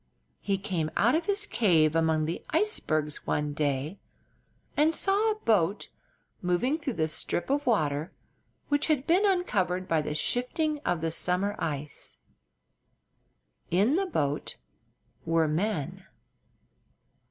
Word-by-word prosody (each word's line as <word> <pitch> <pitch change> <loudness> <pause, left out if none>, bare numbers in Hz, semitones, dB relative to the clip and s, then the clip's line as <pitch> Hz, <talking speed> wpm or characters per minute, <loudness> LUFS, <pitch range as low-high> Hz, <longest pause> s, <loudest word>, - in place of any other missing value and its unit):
He 200 -1 -1
came 185 -6 -2
out 235 +4 +4
of 330 +4 0
his 410 +1 +1
cave 165 - +3
among 160 -1 +2
the 165 +2 -4
icebergs 155 - 0
one 150 0 0
day 145 +4 -2 0.8
and 310 +2 +3
saw 405 +3 +2
a 430 - +1
boat 205 - +1 0.5
moving 185 - +1
through 275 -6 -3
the 155 -1 +1
strip 165 +8 -2
of 285 0 0
water 155 -7 +1 0.6
which 290 0 +1
had 295 -4 +1
been 370 +5 +4
uncovered 190 - 0
by 160 -2 +2
the 150 0 -4
shifting 295 - -1
of 175 - -1
the 165 0 -1
summer 180 +5 0
ice. 150 -2 -4 1.5
In 205 - +3
the 390 +2 +1
boat 145 - -2 0.7
were 165 -1 +2
men. 180 +1 -2
185 Hz, 130 wpm, -28 LUFS, -, 1.5 s, out